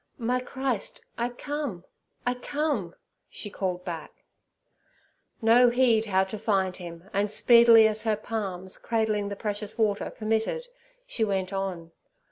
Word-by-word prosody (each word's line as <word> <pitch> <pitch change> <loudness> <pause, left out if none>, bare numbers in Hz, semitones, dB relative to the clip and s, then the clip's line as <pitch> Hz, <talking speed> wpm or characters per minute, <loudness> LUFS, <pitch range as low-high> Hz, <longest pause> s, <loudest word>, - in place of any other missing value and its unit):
'My 250 +1 0
Christ, 255 -3 -3
I 235 +1 -1
come—I 245 - -5
come!' 250 - -2 0.3
she 205 - -6
called 180 -2 -3
back. 165 -3 -7 1.2
No 240 +2 +6
heed 240 -3 +3
how 190 -3 +2
to 190 +2 -6
find 195 -4 +1
Him, 170 0 -9
and 200 +1 +1
speedily 235 0 +7
as 215 0 -1
her 220 -2 +1
palms, 195 -4 -4
cradling 220 -3 0
the 200 - -4
precious 210 +1 -4
water, 210 -3 +1
permitted, 225 - -1 0.4
she 375 - -2
went 195 -2 -1
on. 185 -4 -4
215 Hz, 130 wpm, -27 LUFS, 190-235 Hz, 1.2 s, speedily